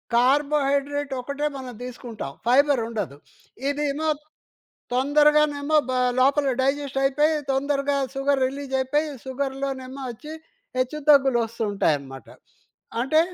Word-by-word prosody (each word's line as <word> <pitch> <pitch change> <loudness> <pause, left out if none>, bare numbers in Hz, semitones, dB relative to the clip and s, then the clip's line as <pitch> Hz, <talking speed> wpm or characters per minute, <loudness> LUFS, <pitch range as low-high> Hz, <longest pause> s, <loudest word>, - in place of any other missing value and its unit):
Carbohydrate 280 +2 +2
ఒకటే 280 +3 -3
మనం 255 -2 -7
తీసుకుంటాం, 235 - -7 0.2
ఫైబర్ 275 0 +4
ఉండదు. 200 -11 -4 0.5
ఇదేమో 295 +2 -1 0.9
తొందరగానేమో 295 +2 +3
బా 255 0 0 0.2
లోపల 275 +1 +3
డైజెస్ట్ 275 0 0
అయిపోయి, 300 +3 +3
తొందరగా 280 +1 0 0.2
సుగర్ 275 0 +1
రిలీజ్ 275 0 -5
అయిపోయి, 295 +4 0 0.2
సుగర్‌లోనేమో 270 0 -4
వచ్చి, 300 +7 -9 0.5
హెచ్చుతగ్గులు 275 -1 +3
వస్తూ 230 0 -6
ఉంటాయన్నమాట. 140 -8 -1 0.7
అంటే 290 +6 +3
275 Hz, 100 wpm, -24 LUFS, 255-290 Hz, 0.9 s, ఫైబర్